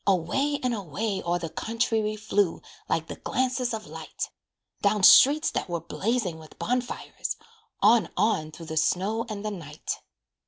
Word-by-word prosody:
Away 270 - +1
and 250 -1 +1
away 200 +1 -2
o'er 175 +1 0
the 165 -2 -5
country 230 0 0
We 215 0 -1
flew 205 -4 0 0.3
like 160 - +1
the - - -8
glances 255 -1 0
of 220 -2 -4
light, - - -6 0.5
Down 205 0 +2
streets 290 +10 +8
that - - -2
were 170 -1 -1
blazing 190 +1 -2
with 155 -1 -14
bonfires, 250 +1 -2 0.5
On, 215 -4 +5
on 180 -6 +1
through 165 +1 -10
the 160 0 -5
snow 210 +8 +1
and 210 -1 -5
the 215 - -1
night. 155 -6 -5
210 Hz, 160 wpm, -27 LUFS, 175-230 Hz, 0.5 s, streets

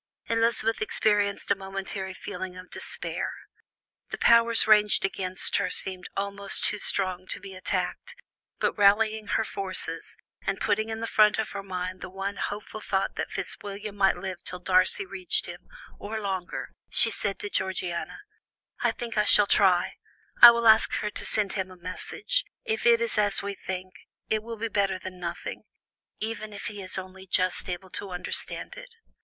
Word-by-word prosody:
Elizabeth 230 0 +1
experienced 205 -2 +1
a - - +5
momentary 190 0 -5
feeling 185 -1 -6
of 185 0 -11
despair; - - -3 0.8
the - - -4
powers 230 0 +6
ranged 210 -2 +5
against 185 -1 0
her - - 0
seemed 185 -1 -2
almost 200 0 -1
too 210 - +1
strong 185 -2 -1
to - - -5
be 195 0 -10
attacked; 475 - -3 0.4
but - - +1
rallying 215 +1 +3
her - - +1
forces, 185 -5 -4 0.2
and 195 - -2
putting 215 +1 0
in 220 0 -4
the - - -1
front 215 -2 +4
of 220 - -2
her 200 - -5
mind 185 -1 -5
the 185 - -6
one 195 +2 -4
hopeful 210 +1 -5
thought 195 -2 -1
that - - -3
Fitzwilliam 205 0 -5
might 195 -1 +3
live 185 -2 -5
till 180 - -4
Darcy 185 - +3
reached 370 -2 -1
him, - - -10 0.3
or 220 +2 -4
longer, 190 -4 -4 0.2
she 225 - +4
said 200 -2 +2
to - - -5
Georgiana: 185 - -2 0.6
"I - - +2
think 235 -3 -3
I - - +5
shall 210 0 +7
try; 190 -3 +3 0.4
I 240 - +14
will 235 0 +3
ask 220 0 +6
her 210 - -1
to - - -6
send 210 -2 0
him 190 -2 -2
a 185 - -13
message, 185 - -2 0.2
if 445 - 0
it 235 -1 +6
is 230 -2 0
as 205 -2 +2
we 200 0 -3
think; 185 -1 -6 0.4
it 215 -1 +1
will 230 +1 -7
be 230 +2 -2
better 200 -3 0
than 185 0 -9
nothing, 175 0 -5 0.6
even 215 -1 -5
if 205 - -8
he 205 -3 -5
is 185 0 -2
only 190 0 -8
just 185 0 +1
able 185 +1 -5
to 200 - -4
understand 180 - -2
it." - - -12
200 Hz, 175 wpm, -27 LUFS, 185-220 Hz, 0.8 s, I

